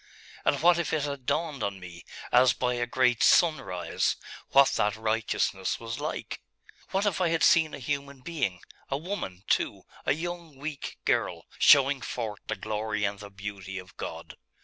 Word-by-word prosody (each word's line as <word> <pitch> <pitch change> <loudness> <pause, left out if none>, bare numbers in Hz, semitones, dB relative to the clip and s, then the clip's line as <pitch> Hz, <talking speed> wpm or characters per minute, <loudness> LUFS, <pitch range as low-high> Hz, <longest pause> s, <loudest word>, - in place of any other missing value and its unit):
And 140 - +2
what 175 0 +6
if 170 - -2
it 155 - +1
had 140 -3 -5
dawned 150 -4 -1
on 100 -2 -2
me, 90 -2 -10 0.3
as 125 +1 +6
by 125 -1 0
a 120 0 -1
great 125 -1 +2
sunrise, 155 - +3 0.3
what 140 0 +6
that 105 -1 +1
righteousness 110 -3 -1
was 115 0 -5
like? - - -4 0.5
What 195 +2 0
if 190 -3 0
I 175 - +3
had 165 0 +1
seen 160 -2 +5
a - - -8
human 140 0 -4
being, 125 - -2 0.3
a 135 - 0
woman, 145 - -5
too, - - 0 0.2
a - - +5
young 170 -1 -6
weak 145 0 -6
girl, - - 0
showing 135 -1 +6
forth 110 -4 -4
the 110 - -1
glory 105 +1 -2
and 100 0 -1
the 100 -1 -9
beauty 100 -1 -7
of 90 -1 -10
God? - - -7
125 Hz, 170 wpm, -28 LUFS, 105-150 Hz, 0.5 s, what